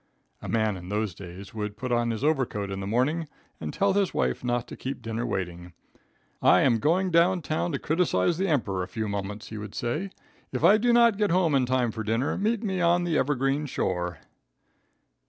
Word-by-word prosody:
A - - -7
man 110 -3 +1
in 90 0 -9
those 105 -1 -1
days, 95 +5 -10
would 105 -1 -4
put 125 +2 -4
on 120 -1 +2
his 115 +2 -3
overcoat 130 -10 0
in 95 - -4
the 95 - -4
morning 145 +9 0 0.3
and - - -4
tell 200 -1 +1
his 195 -2 +1
wife 65 - 0
not 120 -1 -1
to - - -7
keep 135 +1 -5
dinner 115 +1 -3
waiting. 90 -4 -4 0.7
"I 90 - +6
am 120 -5 +3
going 180 - +2
down 175 +1 +3
town 155 +4 -1
to - - +1
criticise 160 - +1
the 195 - +1
Emperor 110 - 0
a 90 - -3
few 110 +4 -3
moments," 100 +1 -4
he 110 - -6
would 105 -1 -8
say. 150 +12 -2 0.4
"If - - -3
I 210 +2 +7
do 240 +2 +3
not 235 -3 +5
get 210 -1 +2
home 170 -3 +2
in 130 -2 +3
time 125 -2 +1
for 110 0 -5
dinner, 115 +5 0
meet 220 +3 0
me 190 -4 -1
on 175 +1 +3
the 170 -2 0
'evergreen 140 +1 +1
shore.'" 90 - -2
125 Hz, 210 wpm, -27 LUFS, 105-170 Hz, 0.7 s, I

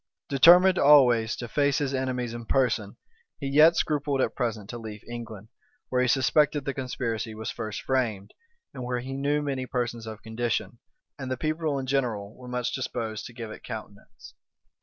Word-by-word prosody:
Determined 175 +7 +7
always 125 -6 +5
to 120 - -6
face 140 +2 +1
his 140 -2 -1
enemies 125 -3 -2
in 120 -1 -7
person, 110 -6 0 0.4
he - - -5
yet 150 +5 +6
scrupled 145 -3 0
at - - +1
present 115 -5 -3
to 120 - -6
leave 110 -2 -8
England, 115 -3 -8 0.4
where 125 0 +1
he 125 - +2
suspected 145 +3 +2
the 140 - -1
conspiracy 115 -4 -3
was 110 0 -4
first 110 -1 -5
framed, 115 -7 -1 0.4
and 125 - -6
where 125 0 -2
he 135 +2 -6
knew 145 +2 0
many 135 -3 -3
persons 120 -3 -3
of 110 -1 -8
condition, 115 +1 -2 0.4
and 130 -1 -5
the 130 - -2
people 155 0 -1
in 135 - -3
general, 115 -6 -1
were 125 - -12
much 125 -1 -2
disposed 115 -4 -4
to 120 - -13
give 115 -2 -7
it - - -10
countenance. 105 -3 -10
125 Hz, 180 wpm, -27 LUFS, 115-140 Hz, 0.4 s, Determined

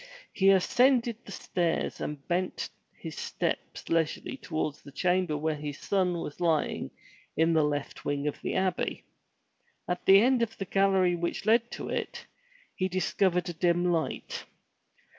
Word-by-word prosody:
He 195 -1 +4
ascended 235 +5 +4
the - - -10
stairs 175 -4 -1
and 145 -2 -5
bent 180 +1 -1 0.3
his - - -7
steps - - -3
leisurely 165 +8 0
toward 155 - -2
the 140 - -11
chamber 180 0 +1
where 155 +1 0
his 145 -1 -5
son 185 -3 0
was 145 - -7
lying 160 - +1 0.5
in 165 +1 +4
the 160 - +4
left 145 -1 -2
wing 145 0 -1
of 150 - -3
the - - -2
Abbey. 190 -1 -1 0.8
At 180 0 -2
the 195 +1 +9
end 250 +2 +4
of 225 -1 -1
the 195 - -3
gallery 190 -2 +3
which 170 +3 -3
led 230 +2 +4
to - - -5
it, - - -4 0.5
he 185 - -1
discovered 185 0 +1
a - - -3
dim 175 +1 +2
light. 165 -2 -2
180 Hz, 155 wpm, -29 LUFS, 160-195 Hz, 0.8 s, the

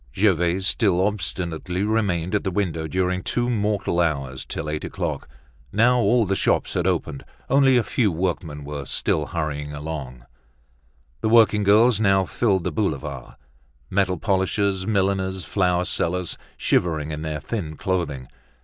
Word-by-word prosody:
Gervaise 95 -2 +2
still 100 -2 +2
obstinately 90 -3 -3
remained 100 -5 0
at 105 - +1
the 95 - 0
window 85 -4 -2
during 90 +2 0
two 120 +5 -1
mortal 105 -5 0
hours, 70 -6 -1
till - - -4
eight 75 0 -3
o'clock. - - -4 0.4
Now 120 +4 +4
all 120 -1 +3
the 95 0 0
shops - - +1
had 90 - 0
opened. 80 -6 -1 0.3
Only 135 -2 +5
a 120 - +3
few 110 -5 +1
work 90 +2 -1
men 75 -3 -8
were 70 -1 -6
still 75 +3 0
hurrying 75 -3 -3
along. 70 -5 -6 1.0
The - - +1
working 110 -2 +5
girls 105 +3 +5
now 95 -3 +3
filled 95 -3 +1
the - - -1
boulevard: 75 - -3 0.6
metal 95 -1 +1
polishers, 95 +1 0
milliners, 95 -3 0
flower 90 0 +1
sellers, 90 0 -1 0.2
shivering 80 -3 0
in 75 0 -4
their 80 -1 -3
thin 80 -2 -5
clothing. 85 -9 -2
90 Hz, 150 wpm, -23 LUFS, 80-100 Hz, 1.0 s, Only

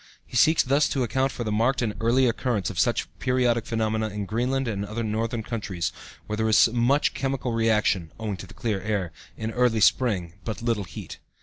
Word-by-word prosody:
He - - -12
seeks 160 +6 +5
thus 140 +3 +2
to 135 - 0
account 130 +3 0
for 120 - -4
the 110 - -2
marked 120 +5 +1
and 110 -3 -1
early 120 +3 +3
occurrence 120 -3 0
of - - -5
such - - +1
periodic 125 -3 +1
phenomena 110 -1 0
in 105 0 -4
Greenland 125 +5 -1
and 100 -3 -2
other 110 +3 -4
northern 110 +1 -2
countries 100 -7 -3 0.3
where 105 - -4
there 110 0 +1
is 110 - +6
much 125 +5 +2
chemical 135 -3 -2 0.2
action 95 -6 +1
(owing 105 -3 -3
to 95 - -9
the - - -15
clear 105 -5 -2
air) 100 -4 -2 0.3
in 110 0 -3
early 120 -1 +2
spring, 100 -6 +2
but 110 -1 -5
little 115 -4 0
heat. 85 - -9
115 Hz, 200 wpm, -25 LUFS, 105-125 Hz, 0.3 s, is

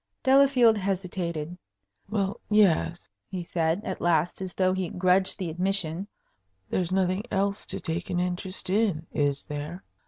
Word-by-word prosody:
Delafield 260 -5 +5
hesitated. 180 -4 -3 0.5
"Well, 200 -2 -1
yes," 190 -5 +3 0.2
he 185 -2 -4
said, 170 +3 0
at 185 - -4
last, 170 +1 +1
as 185 -2 -5
though 185 -1 +2
he 185 -2 -2
grudged 185 +1 +2
the 175 -4 -3
admission. 185 0 -1 0.6
"There's 180 -1 0
nothing 185 0 +1
else 200 +1 -1
to - - -4
take 165 +2 -4
an 175 - 0
interest 180 +1 -2
in, 195 -6 +1
is 145 -2 0
there? 150 +5 -6
185 Hz, 145 wpm, -27 LUFS, 170-195 Hz, 0.6 s, Delafield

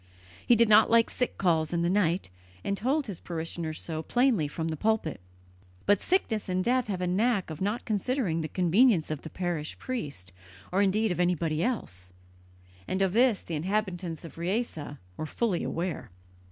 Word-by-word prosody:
He 240 - +7
did 235 0 +5
not 215 +1 +6
like 230 0 +4
sick 250 - -2
calls 160 -5 +2
in 170 -1 0
the - - +2
night, 185 - +1 0.3
and 200 - 0
told 270 +8 0
his 200 -6 -6
parishioners 165 -1 -4
so 160 -2 -4
plainly 240 - +2
from 160 +2 -3
the 160 - -2
pulpit. 210 - 0 0.6
But 205 -1 +4
sickness 225 - 0
and 185 0 +1
death 250 +1 +2
have 190 -3 -3
a - - +1
knack 195 0 +1
of 155 - -7
not 205 +5 -1
considering 215 - 0
the 155 - -2
convenience 185 0 +3
of 155 - -3
the 160 - -8
parish 175 -4 -3
priest, 140 - -5 0.4
or 190 +2 +2
indeed 205 +2 +2
of 175 - -2
anybody 165 -3 +1
else; 95 - -3 0.7
and 190 - -1
of 190 -1 +1
this 240 -2 +3
the 170 - -7
inhabitants 175 -1 -2
of 165 - -11
Riese 190 +2 -1 0.4
were 155 - -3
fully 200 +2 0
aware. 175 +1 -3
185 Hz, 180 wpm, -28 LUFS, 165-220 Hz, 0.7 s, He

